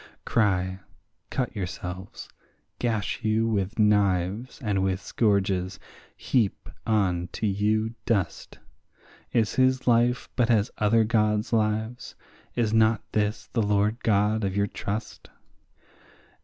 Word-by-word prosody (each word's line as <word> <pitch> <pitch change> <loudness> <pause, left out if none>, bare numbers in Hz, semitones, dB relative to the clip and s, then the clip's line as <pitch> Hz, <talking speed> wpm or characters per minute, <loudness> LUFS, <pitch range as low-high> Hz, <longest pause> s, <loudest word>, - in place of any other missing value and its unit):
Cry, 95 -4 +1 0.5
cut 125 -3 -2
yourselves, 95 0 -6 0.5
gash 110 -5 -1
you 110 +1 +2
with 100 -2 -1
knives 105 +1 +1
and 100 -3 0
with 95 -1 0
scourges, 95 -2 0 0.4
heap 115 -7 0 0.2
on 95 -6 +1
to - - -3
you 105 +2 +1
dust; 100 -6 -1 0.7
Is 115 -2 +1
his 130 0 +3
life 120 +1 +2
but 120 -2 +2
as 110 -2 +2
other 110 +2 +4
gods' 105 -1 +1
lives? 110 +2 -1 0.4
is 115 -3 +1
not 110 -1 +3
this 105 0 -1
the 115 - +2
Lord 105 +2 +1
God 105 0 +2
of 95 -1 -1
your 100 - +3
trust? 105 +2 -5
105 Hz, 115 wpm, -26 LUFS, 100-115 Hz, 0.7 s, other